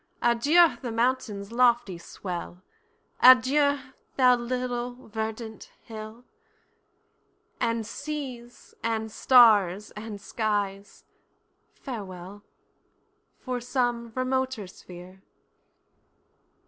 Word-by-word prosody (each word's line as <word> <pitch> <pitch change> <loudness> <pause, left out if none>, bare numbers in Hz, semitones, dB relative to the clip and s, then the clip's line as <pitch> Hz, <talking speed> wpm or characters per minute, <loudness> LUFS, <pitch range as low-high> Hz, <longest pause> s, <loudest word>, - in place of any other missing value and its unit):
Adieu 295 +9 +4
the 245 -3 -4
mountain's 230 -4 -1
lofty 240 -5 +2
swell, 180 0 -7 0.6
Adieu, 270 +3 +6 0.4
thou 250 -2 +6
little 245 0 -4
verdant 220 +1 -6
hill, 220 +2 -10 1.3
And 230 -1 -1
seas, 255 -2 -7
and 220 -1 -2
stars, 210 -6 +5
and 210 -1 -8
skies—farewell, 200 -1 -6 1.0
For 250 -2 -3
some 240 -2 -1
remoter 260 -3 -1
sphere! 180 0 -13
230 Hz, 70 wpm, -26 LUFS, 210-250 Hz, 1.3 s, Adieu